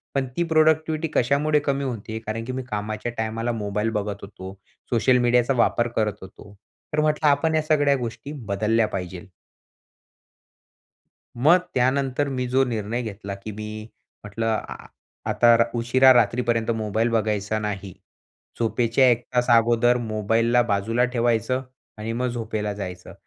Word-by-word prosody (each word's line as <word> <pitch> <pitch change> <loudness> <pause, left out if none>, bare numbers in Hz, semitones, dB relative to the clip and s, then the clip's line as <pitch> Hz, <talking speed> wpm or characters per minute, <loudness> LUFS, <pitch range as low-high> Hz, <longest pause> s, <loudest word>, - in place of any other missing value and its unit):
पण 135 -1 0
ती 170 - +2
प्रोडक्टिव्हिटी 155 0 +2
कशामुळे 145 +4 +2
कमी 140 0 0
होतीय? 110 -3 -5
कारण 110 +1 -5
की 130 - -4
मी 130 0 -4
कामाच्या 105 +3 -3
टायमाला 115 +2 -2
मोबाईल 105 0 -2
बघत 100 0 -4
होतो. 95 -1 -9 0.4
सोशल 125 +2 +3
मीडियाचा 120 +1 +3
वापर 120 0 +1
करत 105 -2 +1
होतो. 95 +1 -13 0.4
तर 150 - +1
म्हटलं 155 0 +1
आपण 160 +3 +2
या 155 - +3
सगळ्या 145 -2 +2
गोष्टी 125 +3 -6 0.2
बदलल्या 110 +2 +1
पाहिजे. 90 0 -6 2.1
मग 150 +9 +5 0.2
त्यानंतर 130 +2 +1
मी 125 -1 -2
जो 130 +1 +3
निर्णय 115 0 -3
घेतला 100 -3 -6
की 100 +2 -8
मी 105 +1 -7 0.6
म्हटलं 110 +2 -3
अ, - - -7 0.5
आता 120 -1 +5
र 115 - +5
उशिरा 130 +3 +5
रात्रीपर्यंत 120 -1 +1
मोबाईल 110 +1 -1
बघायचा 110 -1 0
नाही. 100 -3 -5 0.7
झोपेच्या 120 +3 +2
1 120 0 +1
तास 125 0 +2
अगोदर 120 +1 +4
मोबाईलला 115 +2 +1
बाजूला 115 +5 +1
ठेवायचं 120 +1 0 0.3
आणि 110 +1 -4
मग 125 +2 -1
झोपेला 110 -3 -3
जायचं. 90 -3 -7
115 Hz, 140 wpm, -23 LUFS, 110-130 Hz, 2.1 s, मग